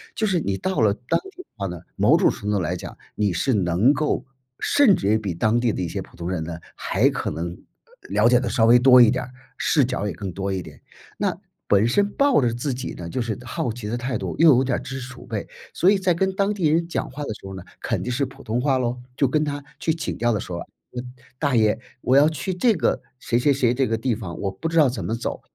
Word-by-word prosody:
就 220 - 0
是 185 -3 +1
你 100 -7 -1
到 190 - -2
了 105 -2 +4
当 125 +4 -1
地 370 - -11
的 - - -52
话 100 -2 -2
呢， 90 -2 -7 0.2
某 - - +5
种 - - +4
程 105 - -5
度 100 -2 +1
来 85 +2 -1
讲， - - -9 0.2
你 105 -3 +1
是 130 +10 +1
能 95 +6 +3
够 150 0 -1 0.4
甚 265 -9 +5
至 100 - -2
于 110 - +4
比 100 -5 -3
当 110 +7 +1
地 120 -3 +1
的 - - -3
一 90 - -1
些 - - -4
普 - - -14
通 85 0 -4
人 90 -3 -2
呢， 85 0 -5 0.2
还 - - +2
可 - - -3
能， 85 +3 -3
呃 85 - -10 0.5
了 105 +4 +4
解 125 0 +5
得 125 - -3
稍 115 - +1
微 120 +2 +7
多 125 0 +8
一 115 -2 +7
点 125 0 -1
儿， - - -13 0.3
视 145 - +3
角 120 -4 -2
也 - - -3
更 100 -3 -5
多 95 +2 -3
一 95 - -2
点。 75 -3 -13 0.4
那 - - -1 0.3
本 100 +1 +4
身 200 +12 +2
抱 280 - +3
着 120 -3 +1
自 130 +3 -2
己 130 +1 -5
呢， 85 -1 -7
就 125 - -2
是 115 -4 -3
好 120 0 -2
奇 115 -2 -7
的 115 +3 -2
态 125 0 -2
度 - - -4
又 165 0 +7
有 130 - +3
点 135 -1 0
儿 - - -6
知 135 0 -6
识 125 0 -8
储 - - -13
备， - - -4 0.3
所 185 - +4
以 205 - +3
在 185 -2 +2
跟 190 +3 0
当 200 +1 +1
地 185 -6 +1
人 165 +2 +2
讲 170 - -3
话 145 +3 -7
的 125 - -3
时 - - -14
候 95 - -7
呢， 95 - -8 0.2
肯 - - -1
定 - - -4
是 135 +3 0
普 135 +1 -12
通 115 +1 -1
话 135 -1 +2
咯， 125 0 -2 0.2
就 140 - +3
跟 150 +4 +1
他 145 -1 -3 0.2
去 160 - +1
请 165 - -4
教 120 +1 +1
的 105 - 0
时 90 - -7
候： 85 - -3 0.4
“嗯， 125 0 -6 0.2
大 140 -2 0
爷， 110 -1 +3 0.2
我 130 - +2
要 145 +2 +7
去 160 +4 -3
这 230 +5 +3
个 165 - 0 0.2
谁， 120 - 0
谁， 135 +4 +3
谁 130 -3 +2
这 135 +2 +1
个 115 - 0
地 115 +1 0
方， 95 -6 -7
我 100 - -1
不 95 +11 -5
知 165 - -1
道 150 - +6
怎 125 - -4
么 110 - -2
走。 115 - -4
120 Hz, 300 characters per minute, -23 LUFS, 105-145 Hz, 0.5 s, 多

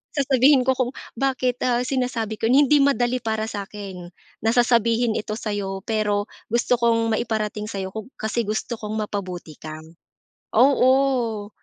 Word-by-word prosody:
sasabihin 270 -1 +4
ko 260 - +3
kung 255 -1 0 0.3
bakit, 255 -2 0
ah, 245 0 +2
sinasabi 250 -4 -2
ko, 225 - +1
"Hindi 285 +4 +5
madali 255 -3 +2
para 220 -2 -2
sa'kin, 200 -4 -6 0.3
na 225 - 0
sasabihin 235 -1 +3
ito 215 0 -4
sa'yo. 200 -3 -4
Pero 210 -1 -1 0.2
gusto 240 +1 +1
kong 230 -1 +2
maiparating 215 -2 -2
sa'yo 195 -3 -4
kung 220 +1 -7
kasi 220 +1 -2
gusto 220 +2 -3
kong 215 0 -3
mapabuti 185 -6 -6
ka." 155 -1 -7 0.8
Oo. 255 -4 +3
225 Hz, 140 wpm, -23 LUFS, 210-250 Hz, 0.8 s, Hindi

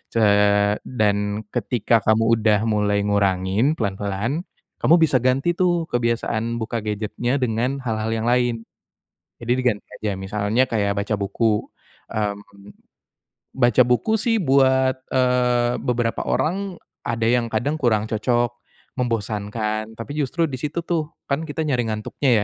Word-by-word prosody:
eee, 105 -1 +4
dan 105 -2 0
ketika 115 -1 +1
kamu 110 +1 +3 0.2
udah 105 -2 +3
mulai 105 -1 +1
ngurangin 100 +6 +1
pelan-pelan, 100 - -2 0.4
kamu 165 - +5
bisa 150 -5 +3
ganti 135 +6 +2
tuh 175 -2 +2
kebiasaan 115 -1 -1
buka 115 +1 -3
gadget-nya 110 +4 -2
dengan 125 +2 -1
hal-hal 110 -2 -2
yang 110 +1 -2
lain. 120 -2 +1 0.8
Jadi 120 +1 -1
diganti 120 -5 0 0.2
aja. 105 - -1
Misalnya 105 +5 +1
kayak 100 -3 0
baca 105 +1 -1
buku, 105 +2 +1 0.5
mmm, 100 -1 -4 0.9
baca 120 -2 +4
buku 125 - +2
sih 230 +1 +1
buat, 130 -4 +3 0.2
eee, 125 -1 +2
beberapa 120 -2 -1
orang, 190 +3 -1 0.3
ada 115 -1 -1
yang 120 0 +2
kadang 120 +7 0
kurang 110 -6 +2
cocok, 120 +2 0 0.5
membosankan. 110 -1 -2
Tapi 115 - -6
justru 150 +4 0
di 135 - -5
situ 150 +4 -3
tuh, 165 -3 0 0.2
kan 140 +3 -1
kita 160 +2 -3
nyari 125 -4 +1
ngantuknya 110 +5 -2
115 Hz, 130 wpm, -22 LUFS, 105-130 Hz, 0.9 s, kamu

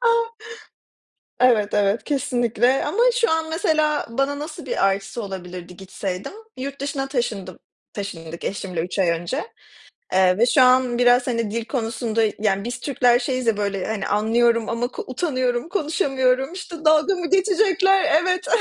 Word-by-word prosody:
A. 475 - 0 1.3
Evet, 225 -5 +3
evet, 205 +1 +1
kesinlikle 255 -2 +1
ama 315 +10 -3 0.2
şu 465 - +3
an 320 0 0
mesela 310 -2 +1
bana 275 +4 -1
nasıl 300 +2 -7
bir - - +1
artısı 195 +4 -2
olabilirdi 180 -2 -8
gitseydim? 190 - -6 0.2
Yurt 275 +1 -6
dışına 280 -1 -3
taşındım 215 - -3 0.3
taşındık 170 -5 -7
eşimle 190 -3 -3
3 180 +4 -4
ay 185 - +3
önce, 175 - -2 0.7
eee, 185 0 +4
ve 235 - +4
şu 260 +2 +4
an 255 -1 +4
biraz, 245 +1 +4
hani, 230 -4 -1
dil 230 0 -3
konusunda 230 -2 -1 0.2
yani, 200 -2 0
biz 240 +2 -5
Türkler 245 -3 +2
şeyiz 255 -1 -2
ya, 220 -2 +2
böyle, 200 -2 -2
hani, 215 -3 -3
anlıyorum 230 +2 +2
ama 235 +1 -1
ko 250 - -7
utanıyorum, 255 -1 -1
konuşamıyorum. 270 -6 0
İşte 340 -4 -8
dalga 310 +5 +4
mı 350 -2 -4
geçecekler? 385 0 +3 0.2
Evet, 365 0 -1
245 Hz, 150 wpm, -22 LUFS, 205-290 Hz, 1.3 s, eee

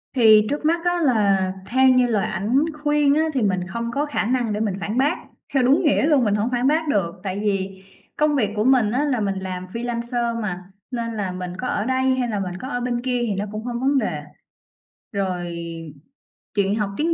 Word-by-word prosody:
Thì 215 -3 +6
trước 295 +1 -2
mắt 335 +2 +1
á, 350 0 +2
là 200 -8 +2
theo 260 +5 +3
như 255 -1 +4
lời 215 -4 +1
ảnh 215 +7 -1 0.3
khuyên 295 -1 +3
á 310 - +3
thì 265 - 0
mình 185 -4 0
không 235 +4 -4
có 285 +4 0
khả 290 - -1
năng 240 -2 0
để 210 - -2
mình 210 -3 -1
phản 210 +4 -3
bác. 290 +6 +2 0.4
Theo 270 -2 +3
đúng 270 +7 +4
nghĩa 295 -2 +3
luôn, 295 -5 +4
mình 210 -2 +2
hổng 210 +4 0
phản 245 +1 +1
bác 315 +2 +2
được, 195 -9 0
tại 195 0 -3
vì 195 -2 -2 0.3
công 300 -1 +2
việc 220 -7 +1
của 210 - +1
mình 245 -4 +4
á 260 +5 +1
là 275 -5 0
mình 195 -2 -1
làm 185 -1 -5
freelancer 235 +2 -2
mà, 185 -4 -4 0.3
nên 230 -2 -3
là 195 -4 -2
mình 180 0 -6
có 250 - -3
ở 210 - -1
đây 260 +1 +2
hay 250 -2 -1
là 210 -2 -1
mình 180 -2 -4
có 255 - -7
ở 245 -3 -2
bên 240 -1 -1
kia 250 -1 -1
thì 230 -4 0
nó 200 +2 -2
cũng 215 +1 -5
không 240 -1 -3
vấn 275 +2 +2
đề. - - -1 0.9
Rồi 180 -4 -2 1.0
chuyện 200 0 +2
học 210 -2 -1
tiếng 330 +3 +1
235 Hz, 230 wpm, -22 LUFS, 200-260 Hz, 1.0 s, Thì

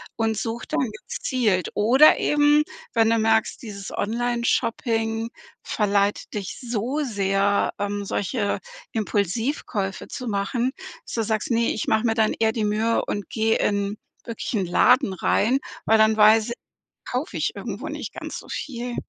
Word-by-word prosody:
und 225 -2 0
sucht 230 +1 -4
dann 260 - +1 0.2
gezielt. 215 -9 0
Oder 255 +9 +6
eben, 295 0 +4 0.3
wenn 225 -1 +4
du 230 - +3
merkst, 220 0 +1
dieses 200 -4 -7
Onlineshopping 230 0 0 0.3
verleitet 205 -1 0
dich 200 -3 -4
so 245 +4 -2
sehr, 200 -3 +1
ähm, 205 0 -2
solche 205 +2 -1 0.3
Impulsivkäufe 205 - -2
zu 250 - -6
machen, 235 +5 0 0.3
dass - - -6
du 225 - 0
sagst: 215 +1 -1
„Ne, 235 0 +2
ich - - -3
mache 220 +2 +2
mir 225 - +3
dann 220 -1 +2
eher 220 -1 +3
die 225 - -1
Mühe 220 +2 +1
und 205 - -4
gehe 225 0 +1
in 200 0 0 0.3
wirklichen 230 -2 -3
in 185 - -1
Laden 250 +6 +4
rein“, 220 +7 +2 0.3
weil 220 - +5
dann 220 0 +4
weiß 215 +1 +5
ich, - - -2 0.5
kaufe - - -3
ich - - -1
irgendwo - - -5
nicht - - -6
ganz - - -6
so - - -14
viel. 245 -3 -4
220 Hz, 155 wpm, -24 LUFS, 205-235 Hz, 0.5 s, Oder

